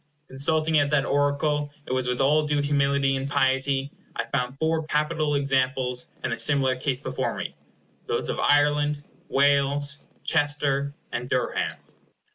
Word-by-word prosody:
Consulting 155 +3 +2
at 145 0 +2
that 150 -2 +2
oracle 145 +1 +1
it - - -6
was 130 -1 0
with 125 0 0
all 150 +3 +4
due 150 -1 +1
humility 140 -1 +2
and 135 +1 -3
piety 135 0 +1 0.2
I 115 - -2
found 125 +1 -2
four 160 +1 0
capital 150 0 0
examples 130 -2 0
in - - -1
a 115 - -3
similar 135 -3 +2
case 130 0 -2
before - - -3
me; - - -5 0.5
those - - -1
of - - -2
Ireland, 145 0 +3 0.3
Wales, 140 +1 +2 0.2
Chester, 145 -2 0 0.2
and 125 +1 -4
Durham. 130 -1 -1
140 Hz, 145 wpm, -25 LUFS, 135-145 Hz, 0.5 s, all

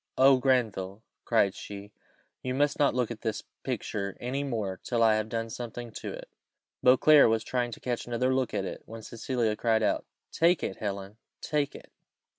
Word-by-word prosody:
"Oh, 135 0 +7
Granville!" 110 -6 0 0.2
cried 100 -5 +3
she, 100 0 -9 0.5
"you 130 0 -2
must 145 +1 +1
not 145 -4 +3
look 125 -2 0
at 110 - -7
this 110 -2 -2 0.2
picture 100 -2 -3
any 135 +3 -2
more 110 -9 -3
till 120 -2 +1
I 110 -1 +6
have 110 0 -1
done 115 0 -3
something 120 0 -6
to - - -6
it." - - -8 0.6
Beauclerc 140 +2 +7
was 110 0 +1
trying 125 0 -1
to 115 - -8
catch 120 -2 -3
another 125 +2 +1
look 130 -1 0
at - - -1
it, - - -6
when 115 0 -9
Cecilia 115 -1 -1
cried 110 0 +2
out, - - +1 0.3
"Take 170 +1 +3
it, 95 - -3
Helen! 100 0 -5 0.2
take 150 -2 -1
it!" - - -12
115 Hz, 185 wpm, -29 LUFS, 110-130 Hz, 0.6 s, Oh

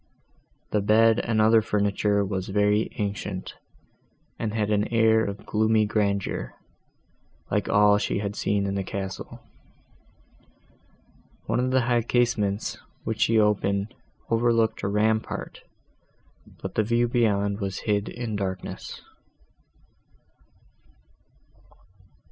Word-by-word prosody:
The 105 - +1
bed 110 +2 +4
and 110 -2 0
other 110 +1 +5
furniture 105 -1 +1
was 95 -1 -3
very 105 +2 +2
ancient, 100 -3 -4 0.9
and 110 - -2
had 105 -1 -1
an 105 0 +1
air 110 -1 +3
of 100 -1 -5
gloomy 110 0 +2
grandeur, 100 - -1 1.0
like - - 0
all 105 0 +5
that 105 - +2
she - - -1
had 100 0 -3
seen 100 -1 0
in 100 - -2
the 100 -1 -2
castle. 95 0 -6 2.0
One - - 0
of 125 +1 +1
the 130 0 +3
high 120 0 +2
casements, 110 -4 0 0.2
which - - -3
she 115 - +3
opened, 105 0 +1 0.4
overlooked 115 -1 +2
a - - -1
rampart, 110 +2 -1 1.0
but - - -4
the - - +2
view 120 +3 +1
beyond 100 -4 +1
was 95 -2 -4
hid 105 -1 0
in 120 -3 -4
darkness. 95 -2 -5
105 Hz, 115 wpm, -25 LUFS, 100-110 Hz, 2.0 s, other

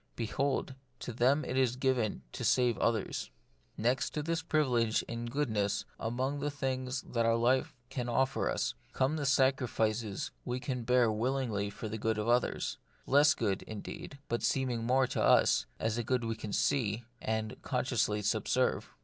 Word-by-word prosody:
Behold, 135 +4 -1 0.2
to 125 - -6
them 130 +6 +3
too - - -6
it 130 - -2
is 125 -2 +3
given 125 - 0
to - - -6
save 125 -2 +3
others. 110 - 0 0.5
Next 120 +4 0
to 150 - -1
this 165 +1 -1
privilege 125 -9 +2
in 115 0 -5
goodness, 110 -6 0
among 130 +5 -1
the 145 +1 -1
things 130 -2 -2
that 115 -1 +1
life 120 +4 +2 0.2
can 125 -2 -3
offer 130 +2 +1
us, - - -1 0.2
come 130 +4 +1
the 145 -3 -1
sacrifices 120 -6 +1
we 125 0 -2
can 125 -2 -3
bear 125 -2 +4
willingly 110 -3 -1
for 105 +2 -6
the 110 +1 -5
good 110 0 0
of 105 +1 -2
others; 120 +1 +1 0.3
less 145 +3 +5
good, 100 -4 0
indeed, 110 +6 -8
but 120 - -1
seeming 125 -4 0
more 130 +2 +4
to - - -2
us, 60 - +4
a 110 +1 0
good 125 +2 0
that - - -2
we 115 - -1
can 110 -1 -6
see, 115 -3 +1 0.2
and 110 +1 -2
consciously 125 -5 0
subserve. 110 +5 +1
125 Hz, 165 wpm, -32 LUFS, 110-130 Hz, 0.5 s, less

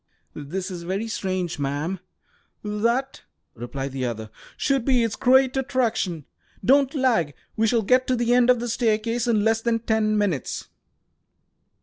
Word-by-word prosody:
"This 180 +7 -5
is 175 -2 -6
very 190 +6 -3
strange, 185 -6 -3
ma'am!" 145 +7 -2 0.6
"That," 235 +6 -1 0.3
replied 135 +4 -5
the 130 -1 -4
other, 110 -2 -6 0.3
"should 275 -2 +1
be 250 -2 +3
its 230 -1 -1
great 260 0 +4
attraction. 230 - -1 0.4
Don't 275 +2 +4
lag. 225 - +1 0.2
We 225 +1 +2
shall 230 0 +2
get 255 +5 +3
to 255 - +2
the 240 0 +1
end 245 0 +4
of 250 -1 +5
the 240 - -3
staircase 230 0 0
in 220 -3 +2
less 225 0 +2
than 235 0 +1
ten 220 -1 +1
minutes." 190 - -2
220 Hz, 150 wpm, -24 LUFS, 180-245 Hz, 0.6 s, of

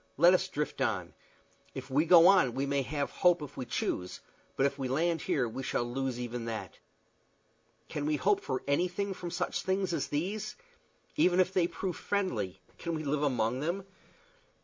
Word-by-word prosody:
Let 170 +5 +7
us 185 +1 +2
drift 150 -5 -3
on. - - -1 0.6
If - - -7
we 150 +5 +3
go 170 0 +8
on 180 -11 +5
we 135 - 0
may 140 0 +1
have 140 +1 -2
hope 175 -3 +3
if 145 - -9
we 130 - -4
choose, 90 -5 -3 0.4
but 135 - +2
if 140 0 -1
we 135 - -1
land 165 +5 +1
here 125 -4 0
we 115 +4 -5
shall 130 - -1
lose 125 +1 -3
even 120 -1 -4
that. 110 -6 -5 1.1
Can 145 0 -3
we 155 - +2
hope 200 +6 +2
for 130 -2 -3
anything 180 +7 0
from 180 -2 -6
such - - -2
things 190 -1 0
as - - -1
these? 195 +8 -3 0.6
Even 180 -10 +4
if 185 0 +3
they 180 -3 +3
prove 180 -1 -4
friendly, 125 - -2 0.2
can 170 -1 -3
we 155 - -4
live 145 0 0
among 125 -4 +1
them? 170 +7 -2
150 Hz, 185 wpm, -31 LUFS, 130-180 Hz, 1.1 s, go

